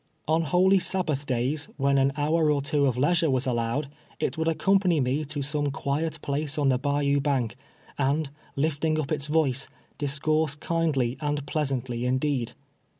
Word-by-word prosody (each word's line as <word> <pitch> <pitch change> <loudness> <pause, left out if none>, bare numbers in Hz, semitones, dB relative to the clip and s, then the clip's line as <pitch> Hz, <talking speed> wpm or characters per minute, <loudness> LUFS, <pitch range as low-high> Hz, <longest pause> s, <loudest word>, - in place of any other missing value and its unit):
On 160 +2 +3
holy 185 +4 +4
Sabbath 170 -6 0
days, 130 +5 0
when 140 -1 +2
an 135 +1 +3
hour 155 +2 +2
or 140 -2 0
two 145 0 +2
of 125 -2 0
leisure 165 +4 +2
was 130 0 +1
allowed, 120 +3 -1 0.3
it - - -1
would 160 0 -1
accompany 185 0 +2
me 135 +3 0
to 145 -1 -3
some 145 +1 0
quiet 150 +3 -2
place 145 +1 -1
on 145 -2 +2
the 130 -1 +2
bayou 140 0 +1
bank, 130 -6 0 0.4
and, 140 +1 0 0.2
lifting 155 +2 0
lip 155 -2 -2
its 150 -1 -1
voice, 150 -4 +1 0.3
discourse 150 +1 +1
kindly 150 -6 0
and 145 -1 -2
pleasantly 130 -5 -1
indeed. 130 -1 0
145 Hz, 160 wpm, -26 LUFS, 135-155 Hz, 0.4 s, holy